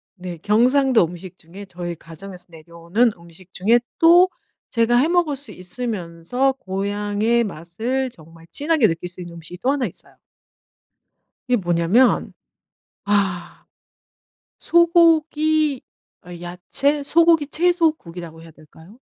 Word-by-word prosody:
네 180 Hz, -2 st, -8 dB
경상도 245 Hz, -, +3 dB
음식 180 Hz, +2 st, -10 dB
중에 185 Hz, +4 st, -12 dB
저희 175 Hz, -1 st, -6 dB
가정에서 180 Hz, +3 st, -10 dB
내려오는 170 Hz, +8 st, -1 dB
음식 170 Hz, +2 st, -17 dB
중에 225 Hz, +6 st, +3 dB, 0.2 s
또 350 Hz, +3 st, +6 dB, 0.4 s
제가 235 Hz, +1 st, +2 dB
해 275 Hz, -, +3 dB
먹을 340 Hz, -4 st, +1 dB
수 285 Hz, +1 st, -5 dB
있으면서 195 Hz, +4 st, -3 dB
고향의 205 Hz, +2 st, -1 dB
맛을 220 Hz, +9 st, -3 dB
정말 165 Hz, -1 st, -17 dB
진하게 295 Hz, -5 st, +2 dB
느낄 165 Hz, +2 st, -4 dB
수 180 Hz, +1 st, -9 dB
있는 175 Hz, -1 st, -9 dB
음식이 170 Hz, +2 st, -10 dB
또 260 Hz, -, +2 dB
1 280 Hz, -3 st, -1 dB
있어요. -, -, -14 dB, 1.3 s
이게 250 Hz, -, +2 dB
뭐냐하면 175 Hz, +6 st, +2 dB, 0.7 s
아 195 Hz, -4 st, -1 dB, 0.9 s
소고기 315 Hz, -4 st, +3 dB, 0.4 s
어 -, -, -11 dB
야채 185 Hz, +12 st, 0 dB
소고기 330 Hz, 0 st, +4 dB
채소국이라고 295 Hz, -, -1 dB
해야 165 Hz, -, -13 dB
될까요? 160 Hz, +7 st, -18 dB
205 Hz, 255 characters per minute, -21 LUFS, 175-275 Hz, 1.3 s, 또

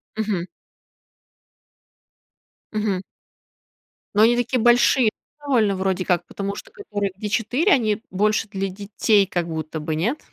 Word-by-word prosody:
Мгм. 205 Hz, -5 st, -2 dB, 2.3 s
Мгм. 210 Hz, -3 st, 0 dB, 1.1 s
Но 205 Hz, -, +4 dB
они 235 Hz, +2 st, +5 dB
такие 245 Hz, +1 st, 0 dB
большие 240 Hz, 0 st, +5 dB, 0.3 s
довольно 240 Hz, -9 st, +2 dB
вроде 190 Hz, -1 st, -1 dB
как. 175 Hz, -1 st, +1 dB
Потому 200 Hz, 0 st, -4 dB
что -, -, -10 dB
которые, 205 Hz, -2 st, -3 dB
где 210 Hz, +1 st, -4 dB
4, 250 Hz, -, +1 dB
они 215 Hz, -5 st, +1 dB
больше 210 Hz, +3 st, +1 dB
для 195 Hz, -1 st, -2 dB
детей 200 Hz, +1 st, +2 dB
как 175 Hz, -2 st, -2 dB
будто 160 Hz, -1 st, -4 dB
бы, 155 Hz, +1 st, -3 dB
нет? 225 Hz, -, -1 dB
205 Hz, 130 wpm, -22 LUFS, 190-225 Hz, 2.3 s, они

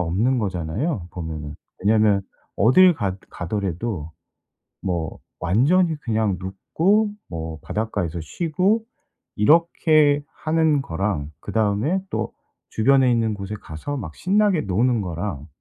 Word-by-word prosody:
없는 100 Hz, +10 st, +1 dB
거잖아요 95 Hz, -, -2 dB
보면은. 80 Hz, -4 st, -6 dB, 0.3 s
왜냐하면 105 Hz, -1 st, +3 dB, 0.3 s
어딜 175 Hz, -, +6 dB
가 95 Hz, -8 st, -2 dB
가더라도 90 Hz, -2 st, -3 dB, 0.7 s
뭐 85 Hz, -5 st, -2 dB, 0.2 s
완전히 155 Hz, -, +3 dB
그냥 110 Hz, -5 st, 0 dB
눕고 175 Hz, -, +1 dB, 0.2 s
뭐 80 Hz, -2 st, -5 dB
바닷가에서 100 Hz, -6 st, -2 dB
쉬고 180 Hz, -, 0 dB, 0.5 s
이렇게 150 Hz, +2 st, +4 dB, 0.2 s
하는 155 Hz, -2 st, +2 dB
거랑 80 Hz, -, -2 dB
그다음에 110 Hz, -, 0 dB
또 -, -, -2 dB, 0.4 s
주변에 130 Hz, +3 st, +4 dB
있는 115 Hz, -2 st, +1 dB
곳에 100 Hz, +1 st, -5 dB
가서 80 Hz, -, -6 dB
막 80 Hz, -, -6 dB
신나게 200 Hz, -2 st, +2 dB
노는 115 Hz, +5 st, +1 dB
거랑 85 Hz, -4 st, -4 dB
105 Hz, 250 characters per minute, -23 LUFS, 90-150 Hz, 0.7 s, 어딜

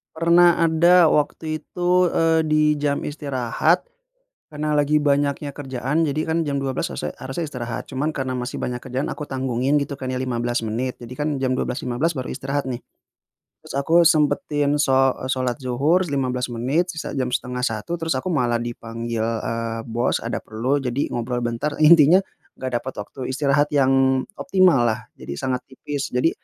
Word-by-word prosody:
Pernah 170 Hz, +1 st, +5 dB
ada 170 Hz, +1 st, +5 dB
waktu 155 Hz, +2 st, 0 dB
itu, 180 Hz, +3 st, +1 dB
eee, 165 Hz, -1 st, +3 dB
di 155 Hz, -1 st, +3 dB
jam 145 Hz, -1 st, 0 dB
istirahat 145 Hz, +3 st, 0 dB, 0.7 s
karena 150 Hz, 0 st, -1 dB
lagi 150 Hz, +1 st, +3 dB
banyaknya 145 Hz, 0 st, +1 dB
kerjaan. 135 Hz, +2 st, -2 dB
Jadi 150 Hz, 0 st, -1 dB
kan 165 Hz, +1 st, +1 dB
jam 140 Hz, -2 st, -1 dB
12.00 135 Hz, -1 st, -2 dB
sese 75 Hz, -, -4 dB
harusnya 150 Hz, +5 st, -4 dB
istirahat. 120 Hz, -4 st, -5 dB
Cuman 145 Hz, +4 st, -2 dB
karena 130 Hz, -3 st, -3 dB
masih 125 Hz, 0 st, -4 dB
banyak 125 Hz, -, -2 dB
kerjaan 130 Hz, +2 st, -3 dB
aku 150 Hz, -, -5 dB
tanggungin 130 Hz, +1 st, 0 dB
gitu 140 Hz, 0 st, -4 dB
kan 130 Hz, -1 st, -4 dB
ya 130 Hz, -, -2 dB
15 120 Hz, -2 st, -1 dB
menit. 115 Hz, +3 st, -3 dB
Jadi 120 Hz, +1 st, -9 dB
kan 150 Hz, +1 st, -1 dB
jam 130 Hz, -1 st, +1 dB
12.15 125 Hz, +6 st, -1 dB
baru 130 Hz, -4 st, -5 dB
istirahat 135 Hz, 0 st, -3 dB
nih. 125 Hz, -1 st, -5 dB, 0.8 s
Terus -, -, -9 dB
aku 160 Hz, +5 st, +3 dB
sempetin 150 Hz, -2 st, +2 dB
sho 135 Hz, -2 st, +3 dB
e -, -, -7 dB
sholat 130 Hz, -2 st, -1 dB
dzuhur 145 Hz, +8 st, +1 dB
15 125 Hz, -2 st, 0 dB
menit, 150 Hz, +10 st, 0 dB
sisa 160 Hz, -, -5 dB
jam 125 Hz, -1 st, -1 dB
12.30 125 Hz, +5 st, -2 dB
terus 165 Hz, 0 st, -1 dB
aku 130 Hz, +7 st, -2 dB
malah 120 Hz, -8 st, +1 dB
dipanggil, 115 Hz, -1 st, -4 dB
eee, 115 Hz, 0 st, -2 dB
bos, 120 Hz, +2 st, 0 dB
ada -, -, -3 dB
perlu. 120 Hz, +6 st, -1 dB
Jadi 135 Hz, 0 st, -2 dB
ngobrol 120 Hz, +1 st, -2 dB
bentar, 120 Hz, +5 st, -2 dB
intinya 165 Hz, +3 st, +7 dB, 0.3 s
nggak 130 Hz, 0 st, -5 dB
dapat 130 Hz, +2 st, -6 dB
waktu 105 Hz, -, -13 dB
istirahat 145 Hz, +1 st, +1 dB
yang 135 Hz, -1 st, +3 dB, 0.2 s
optimallah. 140 Hz, -, +2 dB
Jadi -, -, -7 dB
sangat 125 Hz, -1 st, -2 dB
tipis. 140 Hz, +1 st, -5 dB
Jadi 125 Hz, +6 st, +3 dB
135 Hz, 165 wpm, -22 LUFS, 125-150 Hz, 0.8 s, intinya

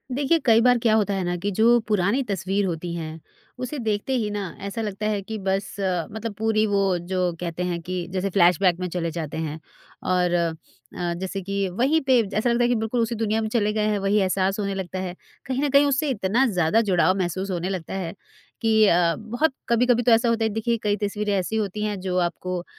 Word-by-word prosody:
देखिए, 290 Hz, +4 st, +2 dB
कई 230 Hz, -5 st, +4 dB
बार 245 Hz, 0 st, +5 dB
क्या 225 Hz, -1 st, +2 dB
होता 205 Hz, -2 st, +1 dB
है 190 Hz, -1 st, -1 dB
ना 175 Hz, 0 st, -1 dB
कि 200 Hz, +4 st, -2 dB
जो 230 Hz, +4 st, +4 dB
पुरानी 210 Hz, +4 st, +2 dB
तस्वीर 195 Hz, -2 st, -1 dB
होती 170 Hz, -1 st, -3 dB
है, 160 Hz, -1 st, -6 dB, 0.4 s
उसे 255 Hz, +4 st, -4 dB
देखते 220 Hz, +2 st, -1 dB
ही 215 Hz, -3 st, -1 dB
ना 205 Hz, 0 st, -3 dB, 0.2 s
ऐसा 200 Hz, +3 st, -4 dB
लगता 210 Hz, -1 st, -4 dB
है 210 Hz, -2 st, 0 dB
कि 220 Hz, +3 st, -6 dB
बस 190 Hz, 0 st, -1 dB, 0.4 s
मतलब 220 Hz, +1 st, -5 dB
पूरी 220 Hz, 0 st, +2 dB
वो 195 Hz, -3 st, +2 dB
जो 185 Hz, -1 st, 0 dB
कहते 175 Hz, 0 st, -3 dB
हैं 175 Hz, -1 st, -2 dB
कि 180 Hz, +2 st, -4 dB
जैसे 190 Hz, +1 st, -1 dB
फ्लैशबैक 180 Hz, -1 st, +3 dB
में 180 Hz, -, -2 dB
चले 170 Hz, -1 st, -2 dB
जाते 155 Hz, -2 st, -5 dB
हैं। 160 Hz, -1 st, -4 dB, 0.4 s
और 180 Hz, -1 st, +1 dB
अ, 170 Hz, -2 st, +1 dB, 0.6 s
जैसे 190 Hz, +2 st, -4 dB
कि 200 Hz, +1 st, -2 dB
वहीं 260 Hz, -, +2 dB
पे 260 Hz, -3 st, +4 dB
जैसा 215 Hz, +4 st, -1 dB
लगता 235 Hz, +1 st, +2 dB
है -, -, +4 dB
कि 245 Hz, -, +2 dB
बिल्कुल 225 Hz, +2 st, -1 dB
उसी 230 Hz, +1 st, -1 dB
दुनिया 220 Hz, 0 st, 0 dB
में 220 Hz, -, -2 dB
चले 210 Hz, -1 st, +1 dB
गए 215 Hz, -1 st, 0 dB
हैं, 210 Hz, -1 st, +1 dB
वही 195 Hz, +2 st, +1 dB
एहसास 190 Hz, +1 st, +1 dB
होने 200 Hz, -1 st, -2 dB
लगता 185 Hz, -1 st, -4 dB
है। 185 Hz, -1 st, -4 dB, 0.3 s
कहीं 265 Hz, +2 st, -1 dB
न 290 Hz, -, +1 dB
कहीं 280 Hz, +1 st, +5 dB
उससे 285 Hz, +2 st, +1 dB
इतना 230 Hz, +1 st, +1 dB
ज़्यादा 180 Hz, +4 st, +2 dB
जुड़ाव 185 Hz, 0 st, +3 dB
महसूस 185 Hz, +1 st, -2 dB
होने 180 Hz, 0 st, -2 dB
लगता 185 Hz, -4 st, -4 dB
है, 185 Hz, -4 st, -3 dB, 0.5 s
कि 220 Hz, -2 st, +4 dB
अ, 170 Hz, -2 st, +3 dB
बहुत 240 Hz, +7 st, -1 dB, 0.2 s
कभी-कभी 245 Hz, +1 st, +3 dB
तो 240 Hz, -, +3 dB
ऐसा 230 Hz, +1 st, +4 dB
होता 230 Hz, -1 st, +1 dB
है -, -, +1 dB
देखिए, 225 Hz, +2 st, -1 dB
कई 205 Hz, -1 st, +2 dB
तस्वीरें 205 Hz, 0 st, -1 dB
ऐसी 185 Hz, +4 st, -3 dB
होती 210 Hz, -1 st, -2 dB
हैं 205 Hz, -2 st, -2 dB
जो 185 Hz, -1 st, -2 dB
आपको 180 Hz, +1 st, -5 dB
अ, 175 Hz, -, -9 dB
200 Hz, 225 wpm, -24 LUFS, 180-225 Hz, 0.6 s, बार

